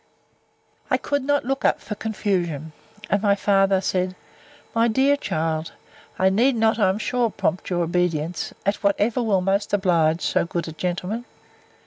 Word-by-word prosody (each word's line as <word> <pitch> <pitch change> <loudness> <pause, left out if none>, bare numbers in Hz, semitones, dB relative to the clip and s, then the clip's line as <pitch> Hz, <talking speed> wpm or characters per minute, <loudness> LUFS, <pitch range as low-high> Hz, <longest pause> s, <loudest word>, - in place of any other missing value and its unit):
I - - +3
could 285 0 -1
not 285 -1 +1
look 270 +1 -2
up - - +3
for - - -6
confusion. 180 -8 -2 0.4
And 200 - +2
my 200 -2 +3
father 195 -1 +3
said, 185 -1 -1 0.6
My 230 +1 +3
dear 265 +5 +3
child, 160 - -2 0.4
I 190 - +3
need 240 +7 +3
not, 220 0 +2
I 190 - +4
am 190 - 0
sure, 240 +1 0
prompt 195 -3 -2
your 175 -2 0
obedience 170 -1 -1
in 200 - +3
whatever 210 +4 +1
will 205 -5 +2
most 195 +2 0
oblige 170 -4 +2
so - - +1
good 170 0 -3
a - - -5
gentleman. 180 +8 -3
195 Hz, 160 wpm, -23 LUFS, 175-220 Hz, 0.6 s, I